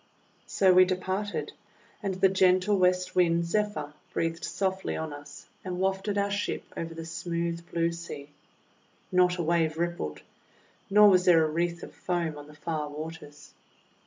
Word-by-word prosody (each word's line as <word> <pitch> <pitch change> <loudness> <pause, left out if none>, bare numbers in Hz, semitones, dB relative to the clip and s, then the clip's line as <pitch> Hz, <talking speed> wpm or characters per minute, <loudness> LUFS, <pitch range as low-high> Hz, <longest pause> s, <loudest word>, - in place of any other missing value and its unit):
So 190 -2 +4
we 185 +1 +8
departed, 185 +2 -2 0.5
and 195 -3 -2
the 190 +1 +4
gentle 185 +1 +3
West 180 -1 +2
Wind, 170 -1 +3
Zephyr, 170 -6 -1 0.2
breathed 165 0 -2
softly 190 -1 -2
on 160 -2 -4
us 145 0 -11 0.2
and 180 -1 -4
wafted 195 +2 0
our 200 0 +1
ship 205 +1 -2
over 165 0 -5
the 165 0 -6
smooth 170 0 -3
blue 170 0 +1
sea. 170 -4 -8 0.8
Not 180 0 +3
a 175 - -1
wave 160 -1 +1
rippled, 170 - -3 0.7
nor 210 +1 +7
was 185 -2 +5
there 165 -3 +6
a 155 - -2
wreath 170 +1 -1
of - - -9
foam 170 -3 -2
on 145 - -11
the 150 - -14
far 150 -1 -3
waters. 150 -1 -9
175 Hz, 160 wpm, -28 LUFS, 165-185 Hz, 0.8 s, we